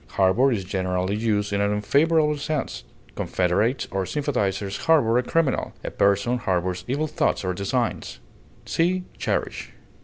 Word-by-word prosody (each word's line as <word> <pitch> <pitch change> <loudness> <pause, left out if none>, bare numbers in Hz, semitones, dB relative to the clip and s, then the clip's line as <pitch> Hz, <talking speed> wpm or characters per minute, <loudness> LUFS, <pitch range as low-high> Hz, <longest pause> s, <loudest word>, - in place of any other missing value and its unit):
Harbor 100 +8 +3
is 105 -6 -1
generally 95 +1 -1
used 105 -2 0
in 100 - +1
an 100 0 +1
unfavorable 150 +9 +2
sense; 150 0 -3 0.3
confederates 100 +8 0
or 95 0 -1
sympathizers 100 -6 -1
harbor 125 -8 +4
a - - +2
criminal; 150 +2 0
a - - -4
person 100 +5 +2
harbors 90 -3 -1
evil 145 +5 0
thoughts 155 -8 0
or 90 - 0
designs. 110 +6 -2 0.5
See 180 +2 +1 0.2
CHERISH. - - -2
110 Hz, 140 wpm, -24 LUFS, 95-140 Hz, 0.5 s, harbor